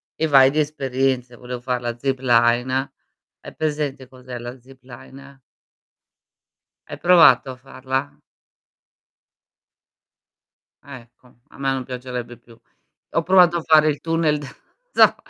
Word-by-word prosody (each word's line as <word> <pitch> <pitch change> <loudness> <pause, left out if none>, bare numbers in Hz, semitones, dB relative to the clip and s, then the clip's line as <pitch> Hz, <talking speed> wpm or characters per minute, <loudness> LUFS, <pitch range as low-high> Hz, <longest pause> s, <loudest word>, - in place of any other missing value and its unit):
e 160 - -1
vai 135 -2 +6
di 155 - -1
esperienze. 135 -4 -2
Volevo 125 0 -8
fare 125 0 -2
la 120 -1 -5
zipline. 130 +1 +1 0.5
Hai - - -12
presente 145 -4 -3
cos'è 125 -1 -10
la 120 +2 -9
zipline? 135 +2 -15 1.5
Hai - - -7
provato 175 -6 +5
a - - -9
farla? 135 +2 -5 2.7
Ecco, 125 -2 -15
a - - -19
me 135 -1 -1
non 135 -1 -3
piacerebbe 125 -1 -7
più. 115 0 -20 0.6
Ho 165 - +1
provato 175 -1 +4
a - - -3
fare 155 -1 +4
il 145 - -3
tunnel 165 -2 0 0.5
da - - +5
130 Hz, 120 wpm, -21 LUFS, 125-145 Hz, 2.7 s, vai